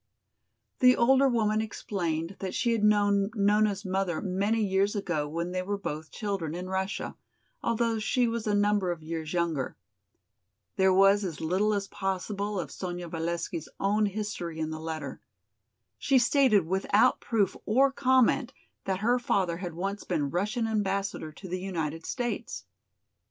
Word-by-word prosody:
The 250 -1 +7
older 265 +3 +4
woman 215 -3 +1
explained 175 -5 -3
that 190 -2 -4
she 235 - +1
had 225 -2 0
known 205 -1 +3
Nona's 205 -1 +2
mother 190 -3 -1
many 205 +3 0
years 195 +2 +1
ago 175 -7 -1
when 170 +3 -3
they 185 0 -1
were 200 +2 -2
both 155 -5 -5
children 195 -8 -3
in 180 +1 -5
Russia, 190 +1 -3 0.5
although 230 -1 0
she 240 +3 +1
was 230 -1 -3
a 205 - +2
number 205 -2 +2
of 165 -2 -6
years 160 -1 -4
younger. 170 -6 -1 1.0
There 190 0 +4
was 195 +2 +5
as 170 -6 -4
little 185 +6 +1
as 200 -1 -2
possible 200 +1 -3
of 155 -5 -5
Sonya 175 -2 -5
Valesky's 165 0 -3
own 210 +2 +2
history 200 -5 -4
in 160 0 -2
the 155 - -5
letter. 160 -1 -5 0.8
She 275 -2 +3
stated 245 - +4
without 195 +7 +3
proof 205 -5 +1
or 265 +5 +4
comment 260 -1 +3 0.3
that 190 0 -1
her 240 +3 +3
father 185 -8 0
had 175 -2 -6
once 195 +4 -3
been 150 -6 -1
Russian 210 +6 0
Ambassador 195 -6 -1
to 190 +5 -11
the 185 +1 -4
United 165 -4 -3
States. 240 0 -3
195 Hz, 155 wpm, -28 LUFS, 175-215 Hz, 1.0 s, The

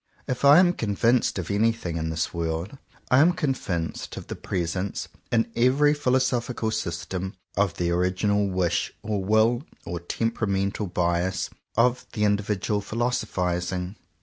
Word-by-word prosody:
If 125 - -3
I 140 +2 +8
am 180 -1 +5
convinced 115 - +1
of 90 -2 -3
anything 105 -4 +1
in 80 0 -2
this 80 +2 -2
world, 85 +8 -3 0.3
I 125 - +6
am 170 +5 +6
convinced 125 - -2
of - - -6
the - - -6
presence, 90 +2 -3 0.2
in 115 0 +2
every 135 +5 +4
philosophical 125 -4 0
system, 90 0 -3 0.2
of 100 -3 +1
the 85 -1 0
original 95 +3 +1
wish, 90 -2 0
or 105 -2 -1
will, 110 +4 +3 0.2
or 85 0 -4
temperamental 100 +1 -1
bias, 90 +1 0 0.3
of 125 +2 +2
the 105 -3 -1
indi 105 0 +3
vidual 105 0 -1
philosophizing. 90 -5 -2
100 Hz, 140 wpm, -25 LUFS, 90-120 Hz, 0.3 s, I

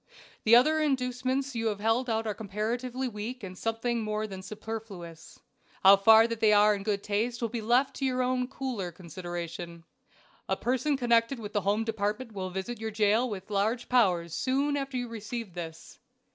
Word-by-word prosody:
The 225 +2 +7
other 310 +6 +5
inducements 260 -1 0
you 230 -1 -1
have 210 -2 -1
held 225 +4 +1
out 225 0 0
are 215 - -1
comparatively 235 +5 -3
weak 230 +2 -6
and 185 -1 -7
something 225 +3 -1
more 215 0 -2
than 190 -3 -7
superfluous. 195 -5 -8 0.4
How 195 +1 +10
far 220 +3 +7
they 225 -2 +2
are 210 0 +6
in 200 - -3
good 200 -1 -1
taste 225 +4 -1
will 230 - -1
be 235 -1 -4
left 250 +5 +2
to 270 - -1
your 255 -1 +1
own 250 0 0
cooler 245 -9 -4
consideration. 170 -1 -7 0.7
A - - +1
person 260 +4 0
connected 235 0 +2
with 210 -2 -7
the 205 - +1
Home 205 +3 +1
Department 220 +2 -2
will 190 -3 -4
visit 190 +6 -5
your 220 0 -3
jail 215 +3 +2
with 195 -1 -7
large 215 +5 0
powers 180 -9 +2
soon 275 +3 0
after 275 -2 -3
you 245 -1 -2
receive 230 -2 -6
this. 165 -2 -8
225 Hz, 180 wpm, -29 LUFS, 200-250 Hz, 0.7 s, How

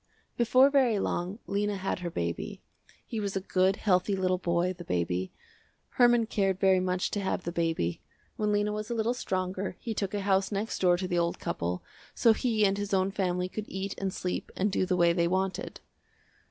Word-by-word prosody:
Before 255 +4 +5
very 260 -6 +3
long, 185 0 -2
Lena 205 +1 -1
had 190 0 -2
her 175 -1 -3
baby. 85 - -4 0.4
He 225 - -4
was 200 -2 -3
a - - +1
good, 190 0 +2
healthy 195 0 +2
little 185 -1 +1
boy, 175 +1 +1
the 175 -1 -10
baby. 90 - -1 0.6
Herman 240 -2 +4
cared 195 -4 0
very 190 -1 +4
much 185 0 -1
to 205 - -1
have 190 -2 -2
the 170 - -3
baby. 165 - -1 0.3
When 210 -1 0
Lena 205 0 +1
was 215 0 -4
a 235 - -1
little 225 +2 +1
stronger 185 -4 -3
he 230 - -4
took 200 -1 -2
a 205 - -1
house 195 0 +1
next 205 +2 -2
door 180 -1 +4
to 185 +1 -3
the 175 -1 +1
old 170 0 0
couple, 90 +1 -3 0.3
so 230 - +5
he 220 -2 +1
and 195 0 +1
his 205 -1 -1
own 190 +1 +1
family 180 -2 -1
could 210 +3 -5
eat 190 +1 -4
and 195 -1 -1
sleep 180 -1 -4
and 200 +2 0
do 185 - 0
the 180 -1 +1
way 170 -1 +4
they 170 -1 +2
wanted. 190 +1 -2
190 Hz, 205 wpm, -29 LUFS, 180-205 Hz, 0.6 s, Before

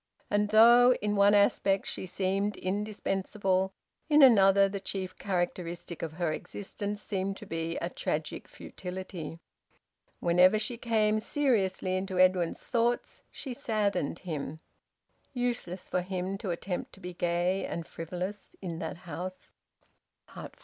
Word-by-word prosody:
And 205 0 +2
though 240 +3 +7
in 210 0 0
one 200 +1 +5
aspect 195 -1 +3
she 185 - -4
seemed 195 +3 -1
indispensable, 195 -1 -1 0.4
in 300 -1 +7
another 195 -5 +7
the 200 0 -4
chief 190 -1 -4
characteristic 175 -2 -3
of 160 -2 -4
her 165 -1 -1
existence 205 +3 -5
seemed 195 -1 -2
to - - -10
be 165 -2 -3
a 170 - -2
tragic 155 -3 -3
futility. 180 -3 -7 0.8
Whenever 180 +4 +5
she 220 +3 -2
came 220 -2 +2
seriously 210 -8 +1
into 190 0 -2
Edwin's 185 -2 +3
thoughts 240 0 0
she 265 - -6
saddened 205 -9 -1
him. 155 -3 -5 0.7
Useless 240 -8 -2
for 180 - 0
him 185 +1 -3
to 205 - -4
attempt 180 +1 -3
to - - -14
be 180 -1 -7
gay 175 +2 0
and 170 - -4
frivolous 180 +6 -6
in 170 -4 -5
that 160 +1 -4
house! 180 +3 -7
190 Hz, 130 wpm, -30 LUFS, 180-210 Hz, 0.8 s, though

